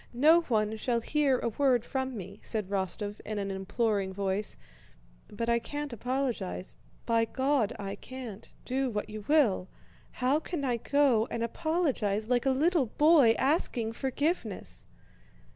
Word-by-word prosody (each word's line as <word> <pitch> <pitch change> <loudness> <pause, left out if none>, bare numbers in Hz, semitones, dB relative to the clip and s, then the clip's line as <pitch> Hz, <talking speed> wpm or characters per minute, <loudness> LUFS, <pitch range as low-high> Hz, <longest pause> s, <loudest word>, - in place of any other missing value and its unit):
No 315 +7 +6
one 220 -7 0
shall 235 +2 0
hear 280 +2 +2
a 235 - -1
word 245 0 +2
from 265 -2 -3
me," 195 +1 -8
said 215 -4 -1
Rostóv 205 +2 -2
in 215 0 -5
an 200 -1 -2
imploring 195 0 -1
voice, 200 +1 -2 0.7
"but 230 +3 -4
I 235 0 +3
can't 290 +3 -5
apologize, 235 - -3 0.3
by 230 -1 +3
God 260 -1 +1
I 195 -1 -5
can't, 245 -6 -9
do 265 +1 0
what 210 -2 -4
you 215 -1 -6
will! 245 -12 +3 0.4
How 265 +4 +2
can 320 -3 -4
I 245 -2 +1
go 255 -3 +2
and 230 - -2
apologize 240 - 0
like 245 +2 +2
a - - +5
little 295 +1 +2
boy 295 -3 +5
asking 255 -6 +1
forgiveness?" 265 - -3
235 Hz, 145 wpm, -29 LUFS, 210-275 Hz, 0.7 s, No